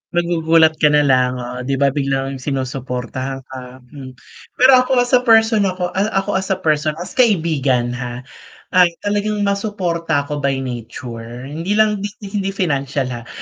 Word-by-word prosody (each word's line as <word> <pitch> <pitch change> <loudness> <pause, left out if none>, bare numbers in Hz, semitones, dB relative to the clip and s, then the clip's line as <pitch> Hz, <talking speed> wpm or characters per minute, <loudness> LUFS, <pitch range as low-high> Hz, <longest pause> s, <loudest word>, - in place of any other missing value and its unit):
Magugulat 165 -2 +3
ka 150 - +5
nalang 130 -4 +3
oo, 125 0 -6
'di 135 - 0
ba, 140 +1 +2
biglang 135 -1 -2
sinusuportahan 130 -1 -4
ka, 130 -1 -11
hmm. 130 -3 -10 0.4
Pero 260 +1 +6
ako 255 -1 +2
as 245 - -6
a 250 - +6
person, 225 -4 +4
ako 180 -1 -3
a 195 +3 0 0.2
ako 200 -1 -1
as 190 - -5
a 190 - +1
person, 155 -4 0
as 175 +3 -7
kaibigan, 155 - +1
ha, 125 0 -6 0.5
ay 180 -1 +6 0.2
talagang 205 0 -1
masuporta 180 -7 -1
ako 145 +1 -5
by 135 -1 -1
nature, 120 -1 -7
hindi 165 +8 -3
lang 215 -1 +3
hi 205 0 -7
hindi 195 -2 -2
financial, 140 -6 -1
ha. 120 -1 -7
150 Hz, 160 wpm, -18 LUFS, 130-195 Hz, 0.5 s, Pero